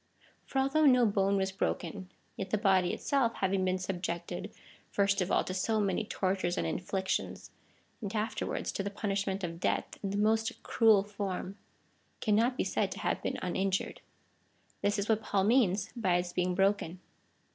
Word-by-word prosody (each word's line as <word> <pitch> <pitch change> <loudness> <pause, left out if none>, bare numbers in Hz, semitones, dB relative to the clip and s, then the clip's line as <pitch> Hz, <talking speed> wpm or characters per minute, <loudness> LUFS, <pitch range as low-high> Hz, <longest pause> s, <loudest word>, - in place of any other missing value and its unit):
For - - -4
although 275 +3 +4
no 250 -2 +6
bone 200 -1 +2
was 190 0 0
h'oken, 190 0 -3 0.3
yet 195 - -5
the 215 - +1
body 190 -4 +3
itself 270 -5 0
having 190 0 0
been 185 0 +1
subjected, 175 -2 -4 0.4
first 200 -1 +2
of 180 - -1
all, - - +3
to 185 - -4
so 215 +4 0
many 200 +1 0
tortures 185 -3 -1
and - - 0
inflic 190 +1 -2
tions, - - -2 0.5
and 200 -3 -4
afterwards 215 0 -2
to - - -3
the 200 - -2
punishment 200 -1 -2
of 170 -1 -4
death - - -1
in 195 - -2
the 200 - -2
most 220 +2 +1
cruel 220 -4 +4
form, 200 -2 -4 0.6
cannot 230 +4 +2
be - - +1
said - - 0
to - - -9
have - - -1
been - - -2
uninjured. 190 +1 -1 0.8
This 205 +1 +1
is 200 +1 -1
what 220 -1 +2
Paul 195 -3 +1
means 210 -3 +3
by 190 -7 +1
its 175 0 -1
being 180 0 0
broken. 195 -2 +1
195 Hz, 175 wpm, -31 LUFS, 185-215 Hz, 0.8 s, no